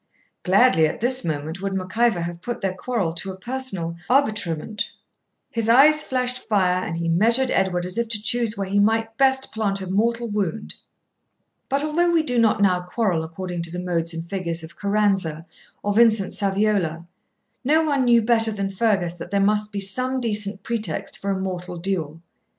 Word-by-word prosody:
Gladly 190 -4 +4
at 155 - -5
this 255 +3 +3
moment 160 +3 -4
would 195 -1 -2
Mac 185 +1 -6
Ivor 230 -6 +2
have 170 0 -5
put 240 +3 -5
their 190 -2 -1
quarrel 190 -3 -2
to 170 +3 -5
a 190 - -10
personal 195 -7 -4
arbitrement, 210 - 0 0.6
his 230 -1 -1
eye 270 +6 +8
flashed 255 -5 -1
fire, 185 -3 +2
and 165 - -4
he 170 0 -2
measured 230 +10 +2
Edward 180 -2 +1
as 180 +5 -2
if 235 - 0
to 220 -2 0
choose 230 0 0
where 195 -1 -3
he 200 +2 +1
might 225 +2 +1
best 265 -1 +2
plant 205 -3 -1
a 190 - -5
mortal 230 +5 0
wound. 210 -1 -3 1.0
But 275 +1 0
although 335 +3 +1
we 335 -2 +3
do 245 -5 0
not 220 -2 +3
now 180 -2 +3
quarrel 180 -2 -1
according 175 +2 -5
to 170 0 -6
the 180 +1 -5
modes 170 -2 -1
and 165 0 -6
figures 170 -3 -3
of 160 +1 -11
Caranza 195 -6 0 0.4
or 205 - 0
Vincent 220 -3 +4
Saviola, 195 -5 0 0.6
no 310 +5 +3
one 285 -4 +1
knew 235 -2 +5
better 225 -1 +2
than 200 -2 -3
Fergus 190 -4 0
that 175 - -8
there 200 +1 0
must 210 +1 +1
be 205 - -3
some 255 +7 0
decent 210 -4 0
pretext 215 -9 -3
for 200 - -4
a 195 -1 0
mortal 180 -1 -5
duel. 165 -3 -3
200 Hz, 185 wpm, -23 LUFS, 180-235 Hz, 1.0 s, eye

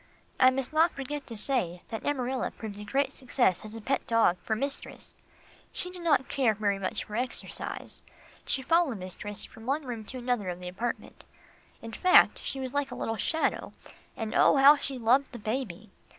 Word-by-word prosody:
I 255 - +8
must 260 +2 -2
not 320 +2 +4
forget 280 +1 -5
to 230 - -6
say 185 -8 +1
that 225 -2 -5
Amarilla 260 -2 -1
proved 210 -2 -8
a - - -6
great 275 +6 0
success 245 -8 +1
as 215 +1 -9
a 225 - -7
pet 270 +5 -1
dog 225 -6 +3
for 220 - -1
mistress. 275 +5 -5 0.6
She 360 - -5
did 360 -1 -8
not 295 -6 +2
care 255 -6 +2
for 215 - -17
very 200 -2 +1
much 190 - -2
exercise. 240 +4 -5 0.4
She 265 - -1
followed 330 -5 +2
mistress 195 +3 -3
from 225 +1 -13
one 285 +2 0
room 235 -3 -5
to 260 - -6
another 245 -6 -1
of 175 0 -5
the 180 - -7
apartment 230 +7 -5 0.6
in 230 - -7
fact, 365 +11 +5
she 270 - -4
was 260 -1 -4
like 285 -1 0
a 245 - -6
little 225 -1 -3
shadow, 320 +8 -1 0.4
and 220 -1 -3
oh! - - +5
how 280 +2 +8
she 280 -2 -4
loved 250 +4 +3
the - - -6
baby. 215 -3 -4
245 Hz, 195 wpm, -29 LUFS, 215-275 Hz, 0.6 s, I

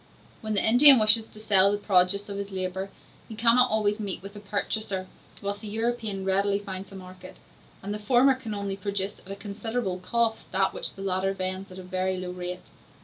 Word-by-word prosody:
When 215 -2 -2
the 200 - +2
Indian 265 +4 +8
wishes 220 0 +5
to 215 - -15
sell 200 -2 +4
the 205 - 0
produce 200 0 +2
of 200 -1 -5
his 200 0 -5
labor, 190 0 -4 0.4
he 220 - -7
cannot 240 +3 +4
always 210 0 +1
meet 200 -3 -4
with 200 +1 -10
a - - -8
purchaser, 200 -1 -3 0.4
whilst 200 0 -3
the 215 - -7
European 220 -2 -2
readily 200 +1 +2
finds 195 -1 -7
a - - -10
market; 185 -1 -11 0.5
and 200 +1 -4
the 210 - -4
former 245 +5 +4
can 245 -5 -6
only 200 -1 -3
produce 200 0 -3
at 195 - -16
a - - -4
considerable 200 0 -4
cost 225 +4 -1
that 190 0 +1
which - - -2
the 195 - -8
latter 190 0 0
vends 185 0 -4
at 185 - -10
a 185 - -8
very 185 0 -2
low 180 -1 -5
rate. 180 0 -7
200 Hz, 205 wpm, -26 LUFS, 190-215 Hz, 0.5 s, Indian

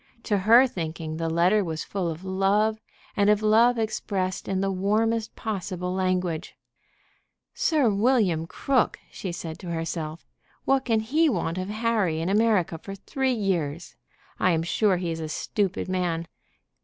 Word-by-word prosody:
To 210 - 0
her 230 +7 +7
thinking 160 -7 -4
the 165 0 -2
letter 180 +6 +3
was 160 -3 -4
full 190 -4 -2
of 165 +2 -6
love, 200 +3 +1 0.4
and 205 0 +3
of 210 0 +3
love 230 +3 +5
expressed 195 -4 -2
in 190 -1 -1
the 195 0 0
warmest 215 +4 0
possible 185 -4 -3
language. 185 -3 -1 1.0
"Sir 315 - +2
William 200 -6 +2
Crook!" 260 +6 +1
she 185 - -5
said 165 -1 -6
to 180 - -7
herself. 165 -1 -4 0.4
"What 270 0 +2
can 225 -3 +2
he 305 +9 +2
want 175 - -1
of 185 +1 -4
Harry 215 -7 0
in 165 +3 -1
America 200 -6 +2
for 195 +3 -8
three 265 +6 -1
years? 175 -7 -2 0.4
I 185 - +3
am 165 0 0
sure 190 +2 +2
he 175 -1 -2
is 165 - -4
a 160 -1 -4
stupid 190 +5 -2
man. 175 -3 -1
190 Hz, 155 wpm, -26 LUFS, 170-220 Hz, 1.0 s, her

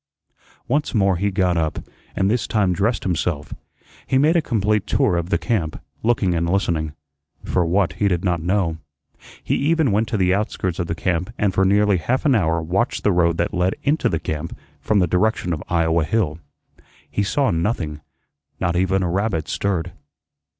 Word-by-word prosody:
Once 145 0 0
more 95 -3 +3
he 100 +3 0
got 90 -3 +1
up, 80 -2 -1 0.4
and 95 - +1
this 115 +4 0
time 100 -4 +1
dressed 105 +5 0
himself. 85 -4 -2 0.5
He 130 - +2
made 155 +5 +4
a 170 - +4
complete 105 -5 0
tour 90 - +2
of 85 0 -2
the - - +2
camp, 95 -10 -2 0.2
looking 110 -6 +1
and 85 0 0
listening, 85 -5 0 0.5
for 90 - +1
what 90 -2 +1
he 100 +4 0
did 90 -1 0
not 85 -3 +1
know. 90 -2 0 0.7
He - - -1
even 155 -2 +2
went 110 +3 +1
to 110 - -1
the 95 -1 +3
outskirts 95 -3 -2
of 85 - -1
the 85 - -2
camp 90 +3 -1
and 100 -2 +1
for 95 +2 +2
nearly 100 0 +3
half 120 - -1
an 140 - +4
hour 80 -7 +1
watched 95 +9 -1
the 105 - +3
road 85 -2 +2
that - - -1
led 90 +1 +1
into 150 +3 +2
the 80 - -1
camp 80 +2 -5 0.2
from 105 - +1
the 90 - +4
direction 90 +1 +1
of 75 - -4
Iowa 85 -1 +2
Hill. 80 -4 0 0.7
He - - -2
saw 130 +7 +1
nothing; 80 -4 -2 0.6
not 85 0 0
even 95 +1 +1
a - - 0
rabbit 90 -3 -1
stirred. 90 -3 -1
95 Hz, 185 wpm, -21 LUFS, 85-105 Hz, 0.7 s, made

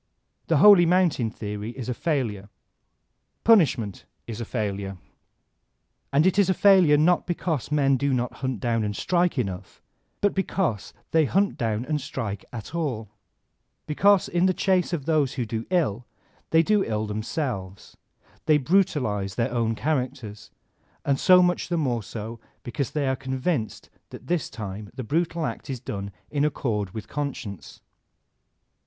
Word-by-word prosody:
The - - +3
holy 200 -5 +8
mountain 170 -10 +2
theory 105 +2 -6
is 125 - -5
a 125 - -1
failure. 115 - -2 0.9
Punishment 140 - +3 0.2
is 115 0 -6
a - - -3
fail 105 -4 -2
ure. 95 -1 -6 1.1
And 145 +4 +3
it 190 +2 +3
is 195 -2 +4
a 190 - +2
failure 185 -7 +6
not 170 +4 +3
because 165 -6 -2
men 140 -2 +3
do 140 +1 0
not 125 -1 -1
hunt 130 -4 -2
down 115 -2 0
and 105 -1 -2
strike 175 - +1
enough, 95 -5 -4 0.4
but 205 - +2
because 190 - -1 0.2
they 160 -1 +4
hunt 195 +8 +1
down 115 0 -2
and 150 0 -1
strike 105 -7 -5
at 115 +3 -8
all; 130 -11 -3 0.8
because 195 +5 +3
in 175 +2 +2
the 185 - +1
chase 185 -3 +1
of 155 -6 -3
those 155 -5 +1
who 125 -4 -2
do 110 +1 -4
ill, 125 - 0 0.4
they 160 0 +4
do 210 +1 +2
ill 110 -1 -2
themselves; 105 - -4 0.5
they 155 - +6
brutalize 130 - +1
their 120 +1 0
own 115 -2 0
char 155 +6 +1
acters, 125 -5 -6 0.6
and 140 -1 +1
so 180 -1 +6
much 180 0 0
the 175 - 0
more 125 -7 0
so 110 +2 -7 0.2
because 125 +2 -3
they 145 -3 -1
are 130 - +1
con 130 0 -5
vinced 130 -7 -2 0.2
that - - -11
this 175 -2 -1
time 105 -1 -7
the 130 - -5
brutal 165 +5 -1
act - - -5
is 130 -2 -3
done 100 -4 -5 0.2
in 145 -1 0
accord 115 -9 -1
with 110 +3 -8
conscience. 135 - -6
130 Hz, 160 wpm, -25 LUFS, 110-165 Hz, 1.1 s, holy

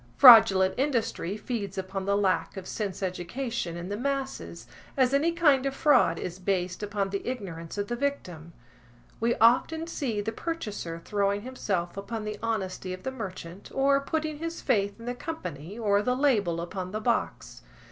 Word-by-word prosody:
Fraudulent 200 -7 +9
industry 230 - -1
feeds 210 -5 -4
upon 190 0 -4
the 200 0 +2
lack 185 -3 0
of 190 - -6
sense 200 -3 -4
education 185 +1 -3
in 175 +2 -6
the 205 - -2
masses, 270 +3 -3 0.3
as 260 -1 +3
any 300 +5 +3
kind 300 -6 +4
of 270 - -3
fraud 260 - +4
is 180 +2 -5
based 185 -1 -1
upon 200 -1 -2
the 200 - -3
ignorance 185 -9 -5
of 205 0 -2
the 240 - -2
victim. 185 - -3 0.7
We 235 +1 +2
often 255 +8 +3
see 265 -10 -2
the 205 +2 -2
purchaser 210 - -4
throwing 200 0 0
himself 195 -9 -3
upon 210 +3 -4
the 210 0 -5
honesty 190 -5 -2
of 185 - -9
the 265 - -2
merchant, 190 -6 -7
or 275 +1 +3
putting 310 +1 -2
his 330 +1 -4
faith 200 -5 0
in 230 - -10
the 245 - -2
company, 185 - -6
or 205 -3 +2
the 250 +3 +1
label 210 - +2
upon 180 +1 -5
the 215 - -1
box. 235 +2 -2
210 Hz, 170 wpm, -28 LUFS, 185-260 Hz, 0.7 s, Fraudulent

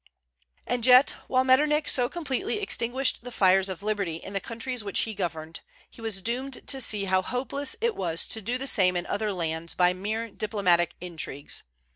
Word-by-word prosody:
And 245 -1 -2
yet 255 +2 +7 0.2
while 255 0 +2
Metternich 295 +4 +3
so 245 -2 +2
completely 345 - -3
extinguished 260 - 0
the 245 - -7
fires 190 -2 +3
of 190 +1 -6
liberty 205 -6 -1
in 190 +4 -9
the 195 - 0
countries 230 +2 -3
which 200 -2 +1
he 220 - -3
governed, 165 -5 -4 0.3
he 230 - -14
was 215 -4 -3
doomed 255 +4 -3
to 270 -1 +1
see 210 -4 +2
how 190 0 +2
hopeless 265 +5 -2
it 470 0 +1
was 170 -3 +1
to 220 - -2
do 235 +5 -2
the 265 - -5
same 185 -8 +3
in 175 - -2
other 210 +1 -2
lands 165 -2 -3
by 180 0 +4
mere 215 +5 -3
diplomatic 185 -6 +2
intrigues. 160 -5 -3
215 Hz, 185 wpm, -27 LUFS, 185-255 Hz, 0.3 s, yet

